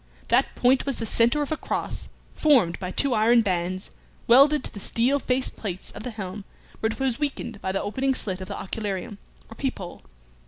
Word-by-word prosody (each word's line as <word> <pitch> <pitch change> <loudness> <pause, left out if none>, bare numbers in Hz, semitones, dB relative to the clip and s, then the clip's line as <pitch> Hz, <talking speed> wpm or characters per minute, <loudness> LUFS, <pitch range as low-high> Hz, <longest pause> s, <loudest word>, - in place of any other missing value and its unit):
That - - +3
point 255 +2 +3
was 275 - -1
the 225 - -1
centre 235 +6 +3
of 290 - -6
a 315 - 0
cross - - -3 0.2
formed 255 - +3
by 185 -2 -4
two 275 +7 +1
iron 230 +1 +5
bands 185 -1 -1 0.3
welded 280 +4 +6
to - - -6
the 205 - -7
steel 245 +7 +1
face 255 0 0
plates 190 -4 -6
of 205 - -9
the 250 - -5
helm 205 -3 -6 0.4
where 220 - 0
it - - -7
was 265 -1 0
weakened 240 -7 -3
by 190 - -1
the 195 - -1
opening 265 +6 0
slit 190 -6 -3
of 185 - -6
the - - -5
occularium, 200 0 -4 0.3
or - - -11
peephole. 225 -9 -4
225 Hz, 200 wpm, -25 LUFS, 195-265 Hz, 0.4 s, welded